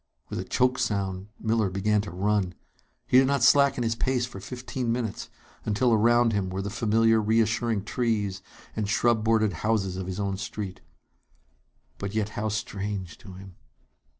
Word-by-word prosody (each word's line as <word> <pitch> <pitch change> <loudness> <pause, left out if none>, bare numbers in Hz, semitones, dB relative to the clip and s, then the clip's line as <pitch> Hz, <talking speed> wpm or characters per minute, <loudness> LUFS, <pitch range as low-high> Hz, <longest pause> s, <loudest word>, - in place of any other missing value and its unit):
With - - -4
a - - -2
choked 125 0 +1
sound, 100 -5 -1
Miller 110 -2 +1
began 105 +3 +1
to 105 - -7
run. 95 +1 0 0.5
He 125 - +5
did 130 - +4
not 140 -3 +1
slacken 140 0 +5
his 115 0 +1
pace 125 +1 0
for 120 -6 -9
fifteen 125 +3 -4
minutes, 115 -3 -3 0.3
until 115 +3 +2
around 120 +1 +4
him 100 -2 0
were 95 +1 -3
the 100 - -4
familiar, 115 0 +3
reassuring 110 0 +1
trees 105 -4 -1 0.3
and 105 -2 -2
shrub 115 0 +2
bordered 110 -3 +2
houses 100 -4 0
of 95 -1 -4
his 95 +1 -4
own 100 -1 -1
street. 100 -1 -6 1.2
But 100 +1 -4
yet 110 -1 0
how 110 +1 -3
strange 100 -4 -4
to 95 -4 -11
him! 95 0 -12
110 Hz, 165 wpm, -27 LUFS, 100-115 Hz, 1.2 s, He